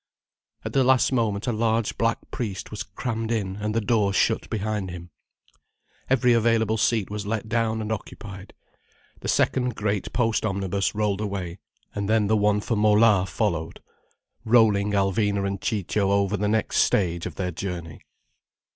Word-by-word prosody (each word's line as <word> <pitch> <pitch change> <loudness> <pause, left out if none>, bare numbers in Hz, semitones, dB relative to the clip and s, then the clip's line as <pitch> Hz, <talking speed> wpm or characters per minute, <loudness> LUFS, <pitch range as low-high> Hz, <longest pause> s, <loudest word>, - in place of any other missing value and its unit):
At - - -4
the 135 - +4
last 130 0 +4
moment 110 -4 0
a 125 - 0
large 115 0 0
black 115 0 +1
priest 100 -6 -4
was 105 - -5
crammed 115 +3 -4
in, 100 -4 -2
and 105 +1 -3
the - - +3
door 105 -2 +1
shut - - +1
behind 105 -2 -2
him. 85 -1 -9 1.0
Every 125 -2 +4
available 115 -1 +2
seat 110 -2 +1
was 105 -1 -4
let 110 0 -2
down 110 -1 0
and 110 - -4
occupied. 100 -2 -7 0.6
The - - -6
second 125 -3 +1
great 105 -2 -2
post 115 -2 +1
omnibus 100 -1 -1
rolled 105 -1 0
away, 95 -4 -4 0.3
and 100 0 -3
then 110 -1 +3
the 110 +2 +2
one 105 0 +2
for 115 - -1
Mola 105 -2 +4
followed, 85 -8 -2 0.6
rolling 110 -3 +3
Alvina 100 0 +1
and 100 -1 -3
Ciccio 100 -1 0
over 100 0 +2
the 105 +1 -1
next 110 0 0
stage 85 -3 +2
of 85 - -9
their 90 -1 -2
journey. 85 -2 -6
105 Hz, 160 wpm, -25 LUFS, 100-110 Hz, 1.0 s, the